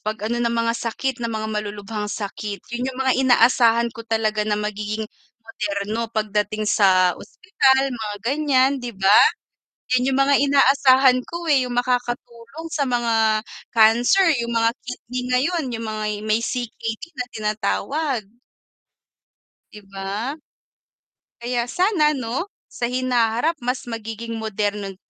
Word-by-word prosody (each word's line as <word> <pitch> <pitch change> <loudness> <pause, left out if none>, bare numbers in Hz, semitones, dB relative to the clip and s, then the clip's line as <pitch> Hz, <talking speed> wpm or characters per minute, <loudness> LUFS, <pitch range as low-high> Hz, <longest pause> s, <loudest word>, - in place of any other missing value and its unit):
'pag 215 0 -4
ano 240 +2 -1
ng 235 - +1
mga 230 0 +1
sakit 245 +2 -3
ng 230 - -2
mga 220 -1 -3
malulubhang 210 0 -4
sakit, 205 0 -5
yun, 245 +2 -2
yung 260 - -7
mga 260 - +3
inaasahan 235 -2 +4
ko - - -10
talaga 220 -1 0
na 210 - +1
magiging 210 +1 -3 0.4
moderno 215 0 -3
pagdating 215 -1 -1
sa 185 -3 +4
ospital 270 -7 +1
mga 215 -3 -5
ganyan, 275 0 +2
'di 240 -4 -7
ba. 195 +1 +3 0.8
Yun 255 +1 +2
yung - - +1
mga 275 +1 +3
inaasahan 270 -2 +5
ko 340 0 -6
eh, 270 -3 +4
yung 245 - -4
makakatulong 245 +3 -3
sa 285 -2 0
mga 225 -3 +1 0.3
cancer, 240 - +5 0.2
yung 235 0 -3
mga 230 0 +3 0.2
kidney 250 0 -5 0.2
ngayon, 325 +5 0
yung 230 0 -4
mga 215 0 -3 0.2
may 215 +1 +1
C-K-D 230 -1 -4
na 250 -2 -4
tinatawag. 215 +5 -2 1.5
'Di 210 - -11
ba. 200 +8 -4 1.1
Kaya 240 0 -1
sana 315 - +2
'no, 255 - -3 0.2
sa 240 - -2
hinaharap 250 +3 +1
mas 250 +2 -2
magiging 230 0 -6
moderno 205 -2 -3
230 Hz, 135 wpm, -22 LUFS, 215-255 Hz, 1.5 s, inaasahan